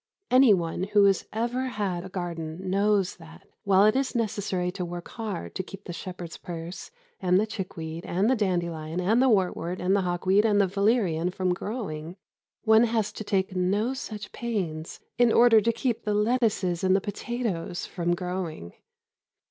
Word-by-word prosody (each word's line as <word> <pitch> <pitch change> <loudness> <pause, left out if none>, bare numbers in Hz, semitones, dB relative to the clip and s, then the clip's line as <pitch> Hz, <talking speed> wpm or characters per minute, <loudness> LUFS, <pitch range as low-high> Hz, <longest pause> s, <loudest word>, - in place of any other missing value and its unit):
Anyone 205 -11 +4
who 205 -1 +6
has 195 -2 +2
ever 240 +4 -1
had 200 -7 -2
a 190 - -8
garden 175 -1 -5
knows 200 -1 +2
that, 170 +3 -15 0.2
while 195 0 +5
it 215 +2 +4
is 265 -1 0
necessary 195 -5 -1
to 180 - -4
work 175 0 -6
hard 215 -6 -5
to - - -2
keep 195 +2 -11
the 175 - -7
shepherd's 175 -1 -7
purse 170 - -7 0.3
and 180 0 +3
the 215 - +2
chickweed 175 -6 -6
and 190 +5 0
the 260 - +4
dandelion 170 -5 -1
and 215 +7 +3
the 265 - +4
wartwort 185 -4 +1
and 185 +2 +2
the 200 - +2
hawkweed 185 +3 +2
and 210 -2 +3
the 200 - +5
valerian 195 -4 +1
from 185 0 0
growing, 175 -6 -5 0.5
one 220 +1 +6
has 220 -2 0
to - - -7
take 195 -1 -1
no 200 +7 +1
such 215 -6 -7
pains 180 -9 -4 0.2
in 240 -2 +5
order 230 -2 +6
to 230 - +2
keep 235 0 -1
the 210 -1 0
lettuces 210 -6 +1
and 185 0 +4
the - - +4
potatoes 205 -4 -3
from 175 -1 -1
growing. 180 - -5
190 Hz, 170 wpm, -27 LUFS, 175-215 Hz, 0.5 s, who